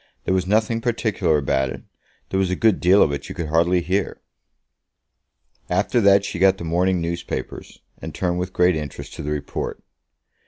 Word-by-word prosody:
There - - +1
was 90 -1 0
nothing 110 +3 +1
particular 110 -9 0
about 65 -2 0
it. - - -8 0.5
There 95 - 0
was 95 -2 +1
a 90 - 0
good 110 +1 +2
deal 95 +3 +5
of 75 - +1
it 70 -1 -5
you - - -7
could 85 -3 -4
hardly 85 +3 +2
hear." 95 +2 -2 1.5
After 105 +6 +1
that 100 -1 +5
she 85 - -5
got 95 0 +4
the - - -7
morning 90 +3 +1
newspapers, 85 +1 -5 0.2
and - - -6
turned 90 -1 -2
with 90 +1 -3
great 90 -1 +3
interest 75 -3 -6
to - - -7
the 75 - -4
report. 75 -1 -4
90 Hz, 185 wpm, -22 LUFS, 85-95 Hz, 1.5 s, deal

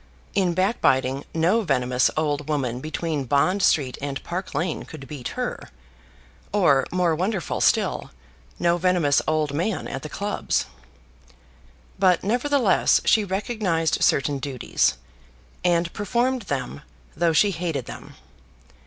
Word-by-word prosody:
In 180 -4 +1
back 190 +6 0
biting, 130 +1 +2
no 175 +8 +2
venomous 125 - +1
old 150 -1 -1
woman 130 -5 -1
between 155 0 -3
Bond 145 +10 +2
Street 135 -8 +2
and 140 -1 -4
Park 180 -2 -5
Lane 165 +2 -1
could 135 -4 -10
beat 135 -4 -6
her, - - -4 0.8
or, 150 -10 +3
more 180 -2 +2
wonderful 190 +3 -2
still, - - +1 0.5
no 170 0 +2
venomous 175 -5 +2
old 155 -2 0
man 180 +7 -1
at 135 - -5
the 155 - -7
clubs. 205 +6 -1 1.3
But 185 -3 +3
nevertheless 245 -1 +2
she 220 - +4
recognised 190 -5 -1
certain 140 0 +2
duties, 130 - 0 0.7
and 170 -1 +1
performed 240 +4 0
them, 135 0 -3 0.3
though 170 +1 +2
she 200 +6 +4
hated 165 -7 -3
them. - - -10
165 Hz, 125 wpm, -24 LUFS, 140-190 Hz, 1.3 s, she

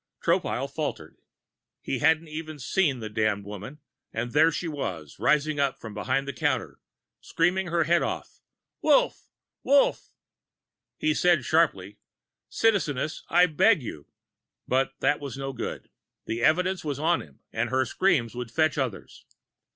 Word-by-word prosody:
Tropile - - +1
faltered. - - -5 0.7
He - - -2
hadn't 160 +1 +3
even 155 0 -6
seen 140 -1 0
the 110 - -4
damned 105 -2 -1
woman, 105 +9 -8 0.3
but 120 +2 -4
there 160 +3 +5
she 170 +2 -3
was, 90 - -5
rising 150 0 +2
up 140 -1 0
from 110 -2 -8
behind 135 +6 -1
the 140 - -3
counter, 120 - -1 0.4
screaming 180 +3 0
her 170 0 +1
head 170 +2 +3
off: - - -4 0.4
"Wolf! - - +2 0.3
Wolf!" 280 +1 +3 0.9
He 155 - +1
said 170 -5 +3
sharply: 105 - +1 0.5
"Citizeness, 160 - 0
I 175 +1 +6
beg 175 - +3
you 75 -10 -8 0.3
" - - -59
But 135 +1 +1
that 145 - +2
was 140 -3 -6
no 135 0 -4
good. 125 - -6 0.3
The 115 +1 -3
evidence 180 +6 +2
was 145 -4 -3
on 165 +4 +1
him 70 -3 -16
and 120 +2 -1
her 130 +1 +1
screams 140 -5 +1
would 125 -1 -5
fetch 155 +4 +1
others. 130 -7 -4
145 Hz, 150 wpm, -26 LUFS, 120-165 Hz, 0.9 s, I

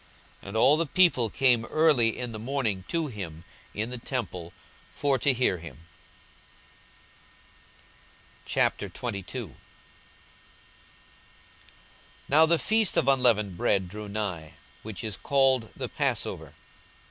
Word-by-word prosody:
42:021:038 - - -14
And 105 - -3
all 140 +6 +5
the 165 - +1
people 150 -9 +3
came 125 -2 +2
early 140 -6 +2
in 125 -1 -4
the 110 - -7
morning 115 -6 -2
to 165 -1 -1
him 90 - -7 0.3
in 110 +4 -3
the 125 - -6
temple, 95 -10 -5 0.4
for 140 -2 0
to 140 - +3
hear 120 -8 0
him. 85 0 -12 2.6
42:022:001 100 - -2 2.7
Now 155 +3 +6
the 170 +1 +4
feast 220 +2 +1
of - - +2
unleavened 120 -8 +3
bread 95 +1 +1
drew 105 +3 -8
nigh, 95 -7 -4 0.3
which 105 -5 -7
is 110 -2 -4
called 135 -4 +2
the - - -4
Passover. - - -3
115 Hz, 115 wpm, -27 LUFS, 100-135 Hz, 2.7 s, Now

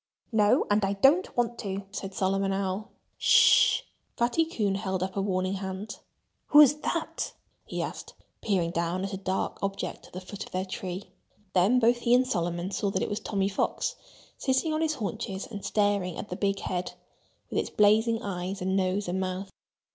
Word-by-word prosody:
"No! 210 -2 +4
And 205 0 +3
I 195 0 +1
don't 275 - +3
want 240 -1 0
to!" 195 -1 -4
said 195 -1 -6
Solomon 195 +1 +1
Owl. 195 +3 -2 0.3
"S - - -13
sh!" - - +6 0.4
Fatty 245 +8 +2
Coon 215 - -1
held 190 -2 -2
up 190 0 -4
a 200 - 0
warning 185 -1 0
hand. 190 +2 -5 0.5
"Who's 295 -2 +8
that?" 320 +2 -3 0.3
he - - -3
asked, - - -7 0.3
peering 180 -6 0
down 170 +2 -1
at 195 - -5
a - - -2
dark 190 0 -2
object 195 0 -4
at - - -22
the 180 - -5
foot 190 +2 -7
of - - -13
their 185 +1 -2
tree. 185 0 -6 0.4
Then 195 +7 +4
both 240 0 +4
he 240 0 +4
and 255 +1 +4
Solomon 175 -5 -2
saw 200 +1 -1
that 190 -1 -1
it - - -2
was 205 - -2
Tommy 195 -2 -1
Fox, 200 - -1 0.4
sitting 265 +4 +1
on 310 - 0
his 315 -1 +1
haunches 210 -3 -4
and 205 -3 -8
staring 205 -4 +1
at 205 - -6
the - - -3
big 195 -1 -1
head, 180 0 -3 0.6
with - - +1
its - - -2
blazing 220 +3 +3
eyes 190 0 -4
and 190 +1 -1
nose 190 +1 0
and 180 +2 -1
mouth. 185 +1 -3
195 Hz, 190 wpm, -28 LUFS, 190-220 Hz, 0.6 s, Who's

